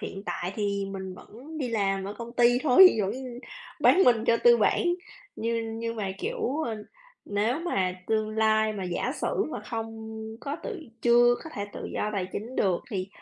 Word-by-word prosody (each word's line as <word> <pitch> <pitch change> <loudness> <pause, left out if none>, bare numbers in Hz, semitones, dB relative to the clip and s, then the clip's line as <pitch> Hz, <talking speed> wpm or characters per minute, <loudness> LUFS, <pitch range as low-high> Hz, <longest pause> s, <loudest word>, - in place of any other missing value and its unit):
hiện 195 - -6
tại 180 +2 -3
thì 200 -1 -1
mình 190 -1 -6
vẫn 275 - -11
đi 260 -5 -2
làm 195 -3 0
ở 200 - -5
công 235 +1 -8
ty 245 0 +4
thôi, 315 +5 +8
vẫn 195 -1 0 0.7
bán 380 - +6
mình 235 -2 +4
cho 230 - +4
tư 475 0 +8
bản, - - +2 0.5
như 230 0 -1 0.2
nhưng 230 0 -3
mà, 195 -3 -2
kiểu, 270 +8 -2
ơ, 225 - -3 0.5
nếu 215 +9 0
mà 190 - 0
tương 215 -1 0
lai 220 0 +2
mà 195 -3 -5
giả 180 +9 -2
sử - - 0
mà 210 - -5
không 225 0 -6 0.3
có 280 +4 -4
tự 430 -8 -5 0.2
chưa 240 0 +6
có 320 - -8
thể 200 - -3
tự - - -7
do 210 - -1
tài 190 -3 -1
chính 230 +5 -6
được 185 -3 +2
thì, 190 -3 -3
220 Hz, 190 wpm, -27 LUFS, 200-240 Hz, 0.7 s, thôi